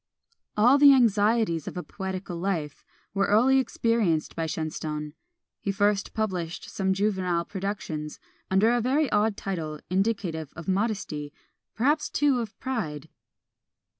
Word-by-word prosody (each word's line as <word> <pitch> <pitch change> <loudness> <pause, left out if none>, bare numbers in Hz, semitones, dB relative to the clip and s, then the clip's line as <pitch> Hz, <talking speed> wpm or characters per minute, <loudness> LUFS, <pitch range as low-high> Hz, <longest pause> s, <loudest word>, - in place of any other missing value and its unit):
All 245 +7 +6
the 285 -1 +9
anxieties 215 - +2
of - - -5
a 180 - -3
poetical 190 -2 -5
life 170 -6 -3 0.3
were 195 0 +1
early 250 +6 +5
experienced 230 -11 0
by 165 -1 -2
Shenstone. 150 -1 -4 0.5
He 200 - -2
first 205 0 +1
published 180 -6 -3
some 190 -1 0
juvenile 190 -4 0
productions, 185 -7 -4 0.3
under 195 +5 +4
a 240 0 +2
very 270 +4 +1
odd 210 0 +2
title, 160 -6 -4
indicative 185 -6 -1
of 170 -1 -9
modesty, 190 -7 -1 0.4
perhaps 295 +6 +1
too 285 -4 +2
of 225 -2 -6
pride. 160 - -4
195 Hz, 130 wpm, -26 LUFS, 165-225 Hz, 0.5 s, the